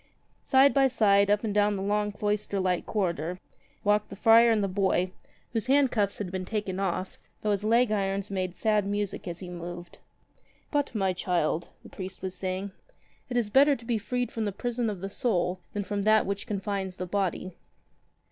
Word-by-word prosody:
Side 270 +1 +5
by 275 -1 +5
side, 200 -5 +3
up 205 +1 +2
and 215 -2 -1
down 205 0 +3
the 190 - -3
long 210 +1 0
cloister 205 -1 -1
like 185 -2 0
corridor, 175 -4 -1 0.5
walked 210 0 +2
the - - -8
friar 230 +3 +6
and 220 -2 +2
the - - +1
boy 185 -1 +1 0.2
— - - -36
whose 225 0 -1
handcuffs 255 -7 +2
had 190 -4 -4
been 185 -1 -3
taken 195 -1 -3
off, 185 -1 -2 0.2
though 210 - 0
his 200 0 0
leg 230 +1 +3
irons 195 -1 -1
made 185 -2 -2
sad 210 -3 +1
music 205 -1 -3
as 175 +1 -6
he 185 - -7
moved. 175 0 -8 0.7
"But, 290 -4 0
my 190 -3 +1
child," 175 -2 0 0.2
the - - -12
priest 185 0 -8
was 185 -1 -3
saying, 190 +1 -3 0.6
"it 245 - -1
is 220 -4 0
better 280 +4 +6
to 230 - -12
be 230 -2 0
freed 245 +3 -2
from 225 -1 -2
the 205 - -1
prison 240 +3 -2
of 200 -4 -5
the 195 - -3
soul 185 -4 0
than 205 - -2
from 205 +1 -2
that 215 +2 +4
which 200 0 -3
only 210 -4 -2
confines 195 -2 -3
the 185 - -4
body." 185 -1 -2
200 Hz, 200 wpm, -28 LUFS, 185-220 Hz, 0.7 s, friar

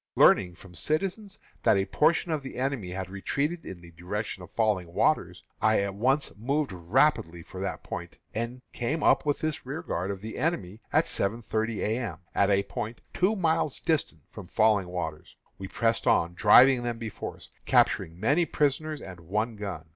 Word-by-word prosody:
Learning 90 -3 +5
from 95 0 -15
citizens 190 - -2 0.2
that - - +4
a 95 - +1
portion 165 - +2
of 155 -2 0
the 135 - -8
enemy 130 -7 -2
had 95 0 -4
retreated 145 - -2
in 90 -2 -8
the 85 0 -13
direction 95 +4 -4
of 90 - -10
Falling 105 -7 0
Waters, - - +1 0.2
I 110 -1 +4
at 100 0 -2
once 130 +8 +1
moved 140 +4 -1
rapidly 90 - +1
for 95 - -9
that 95 - -4
point, - - -7 0.2
and 120 +3 -4
came 145 +7 -2
up - - +4
with 145 - +1
this 155 -1 -2
rearguard 130 - -3
of 100 -1 -4
the 110 +1 -6
enemy 110 - -1
at - - +4
seven 110 +4 -1
thirty 110 0 -1
A. 110 +3 0
M., 120 - -4 0.2
at 100 - +3
a 100 0 +3
point 110 +3 -5
two 195 +5 +2
miles 160 -6 +1
distant 135 - -1
from 100 -4 -9
Falling 110 -3 +3
Waters. 85 -4 -5 0.2
We 95 - -5
pressed 115 +3 0
on, 85 +1 +3
driving 125 +7 +7
them 120 -1 -3
before 115 -3 -6
us, - - -15 0.2
capturing 80 +2 +2
many 145 - +3
prisoners 150 +1 0
and 95 -2 -9
one 105 +7 -2
gun. 95 -6 -6
110 Hz, 185 wpm, -28 LUFS, 95-140 Hz, 0.2 s, driving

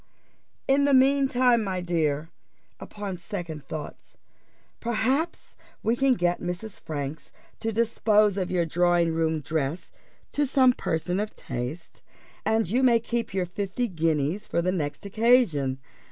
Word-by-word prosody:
In 280 +1 +4
the 285 -1 +4
mean 270 +1 +4
time, 245 -3 +3
my 190 -2 -2
dear, 160 -3 -1 0.5
upon 200 -3 -6
second 170 -4 -6
thoughts, 150 +2 -8 0.6
perhaps 255 +8 -1 0.3
we 225 +2 +2
can 270 0 +3
get 175 -3 0
Mrs. 180 +4 -5
Franks 145 0 -5 0.3
to 225 - -2
dispose 215 -2 +3
of 185 -3 -2
your 175 -2 +1
drawing 175 0 +2
room 160 -1 0
dress 155 +2 -3 0.4
to 290 -1 +1
some 260 -1 +5
person 180 -2 -2
of 210 +1 -3
taste, 130 +6 -6 0.4
and 220 -2 +1
you 240 +9 +1
may 240 -3 +5
keep 235 0 -3
your 190 -2 0
fifty 200 +6 -2
guineas 165 0 -1
for - - 0
the 180 +2 +1
next 155 -1 -3
occasion. 200 - +3
185 Hz, 140 wpm, -26 LUFS, 165-235 Hz, 0.6 s, some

